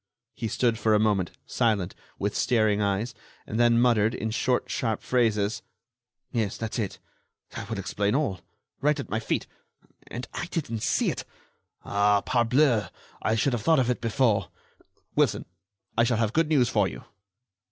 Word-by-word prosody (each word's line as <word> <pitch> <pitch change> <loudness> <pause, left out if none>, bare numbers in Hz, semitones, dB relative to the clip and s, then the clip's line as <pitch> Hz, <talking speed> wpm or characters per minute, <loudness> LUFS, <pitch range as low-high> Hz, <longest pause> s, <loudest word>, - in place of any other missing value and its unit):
He 115 - -4
stood 115 0 +1
for 110 -2 +3
a - - +4
moment, 105 -5 +2 0.2
silent, 105 -6 0 0.2
with 100 +1 -2
staring 110 -4 +2
eyes, 100 +4 0 0.3
and 110 - -3
then 120 -1 +5
muttered, 115 -2 +3
in 110 - -3
short, 125 +2 0
sharp 115 -4 -2
phrases: 110 -4 +1 0.7
"Yes, 110 -4 -1
that's 115 +1 -4
it... 100 -4 -2 0.5
that 110 -2 -7
will 115 - -3
explain 100 +3 -1
all... 115 - 0 0.4
right 150 +1 +2
at 135 - -6
my 110 - +1
feet... 110 - -1 0.6
and 125 +2 -6
I 175 - -4
didn't 135 -11 -3
see - - +1
it... - - -5 0.6
ah, 100 0 +3
parbleu! 120 -1 +3 0.3
I 110 - +1
should 130 +4 +1
have 120 - -1
thought 160 +8 +4
of 125 -2 +2
it 125 - -3
before.... 115 -4 +1 0.7
Wilson, - - +2 0.5
I 115 - +4
shall 120 -1 +2
have 110 -1 0
good 160 -1 +2
news 135 -6 +4
for 105 -5 +2
you." - - -8
115 Hz, 165 wpm, -27 LUFS, 105-125 Hz, 0.7 s, then